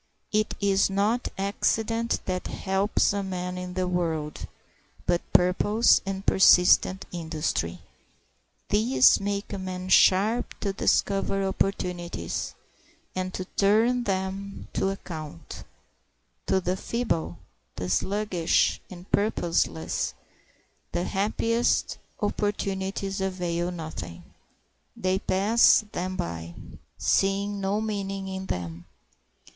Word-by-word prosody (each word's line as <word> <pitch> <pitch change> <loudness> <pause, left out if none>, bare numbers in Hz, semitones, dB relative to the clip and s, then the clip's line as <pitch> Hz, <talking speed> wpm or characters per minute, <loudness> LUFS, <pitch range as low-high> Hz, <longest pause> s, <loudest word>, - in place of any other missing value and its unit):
It 215 0 +1
is 195 -1 +3
not 210 +5 +1
accident 225 +3 0
that 185 -1 -2
helps 195 +2 +1
a 200 - -1
man 180 -1 -4
in 180 0 -6
the 185 -1 0
world, 165 -4 -2 0.6
but 175 -1 +2
purpose 205 +5 +4
and 195 0 -4
persistent 185 0 +5
industry. 155 - -2 0.9
These 230 +5 +5
make 200 +1 -3
a 200 - -3
man 185 0 -5
sharp 210 +6 +4
to 200 -2 -1
discover 195 0 +1
opportunities 180 -2 -2 0.6
and 185 0 -2
to 185 - -4
turn 225 +6 +2
them 195 +1 -3
to 195 - +1
account. 155 - -7 0.8
To 190 - +3
the 180 0 -1
feeble, 190 - -2 0.4
the 90 - -4
sluggish 190 - +1
and 180 -1 -10
purposeless 95 - 0 0.8
the 175 - 0
happiest 225 +5 0 0.2
opportunities 195 -1 -2
avail 175 -2 -1
nothing. 120 - -7 0.7
They 185 +1 0
pass 210 +4 +4
them 185 +1 -3
by, 85 - -5 0.4
seeing 200 +1 +1
no 195 +2 0
meaning 195 -3 -3
in 190 0 -5
them. 85 -1 -5
190 Hz, 105 wpm, -26 LUFS, 180-200 Hz, 0.9 s, persistent